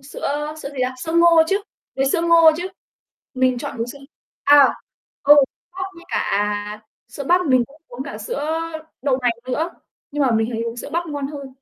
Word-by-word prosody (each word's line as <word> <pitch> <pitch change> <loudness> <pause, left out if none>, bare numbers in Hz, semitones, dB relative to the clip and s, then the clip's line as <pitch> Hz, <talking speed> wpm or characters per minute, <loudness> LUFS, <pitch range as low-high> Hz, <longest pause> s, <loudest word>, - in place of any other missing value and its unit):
Sữa, 270 +1 -11
ơ, 295 +2 -2
sữa - - -4
gì 280 - -10
ta, 255 +1 -1
sữa 320 - -3
ngô 335 -1 +6
chứ, 395 - +3 0.4
với 270 0 +1
sữa 335 - +2
ngô 335 -1 +7
chứ. 355 +2 -4 0.7
Mình 255 -1 +2
chọn 280 +1 -5
uống 230 - -2
sữa 280 +3 -9 0.4
à, 285 -2 +8 0.6
ừ, 295 +1 +8 0.4
bắp 370 +1 -4
với 340 - -13
cả 205 -2 -1 0.3
sữa 280 - -7
bắp 355 +4 +3
mình 255 -3 +4
cũng 295 +4 -20
uống 245 +2 -7
cả 280 -7 -7
sữa 290 +8 -3 0.4
đậu 265 -2 +1
nành 245 -1 +3 0.2
nữa, 310 +7 -1 0.4
nhưng 290 0 0
mà 260 - +2
mình 225 +1 +1
thấy 225 -1 -2
uống 230 0 -5
sữa - - -6
bắp 340 +1 -1
ngon 285 -3 -3
hơn. 280 -1 -7
280 Hz, 205 wpm, -21 LUFS, 250-320 Hz, 0.7 s, à